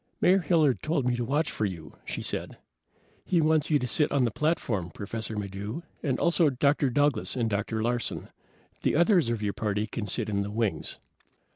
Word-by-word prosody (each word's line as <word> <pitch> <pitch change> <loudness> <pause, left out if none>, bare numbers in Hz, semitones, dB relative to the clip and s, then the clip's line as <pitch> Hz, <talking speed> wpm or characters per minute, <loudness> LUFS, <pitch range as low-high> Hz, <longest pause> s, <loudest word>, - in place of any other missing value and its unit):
"Mayor 190 +2 +5
Hilliard 155 -6 +2
told 155 -4 0
me 125 - +2
to 120 - -2
watch 145 +6 0
for 110 - -1
you," 85 -6 -6
she - - -4
said. - - -3 0.7
"He 180 - +1
wants 155 -1 +2
you 150 - +4
to 125 - -2
sit 150 +4 +2
on 140 -3 +2
the 115 - 0
platform, 115 - -1
Professor 110 +4 -5
Maddox, 105 - -5 0.2
and 135 -3 -1
also 170 -2 +3
Dr. 140 +1 +2
Douglas 145 -3 +1
and 120 -3 0
Dr. 110 +1 -1
Larsen. 120 0 -2 0.5
The - - +1
others 170 - +4
of 115 -2 -2
your 100 -1 0
party 105 -1 -1
can 110 -1 -5
sit 95 - 0
in 100 -2 0
the 100 - -3
wings." 110 -1 -2
120 Hz, 190 wpm, -28 LUFS, 105-150 Hz, 0.7 s, Mayor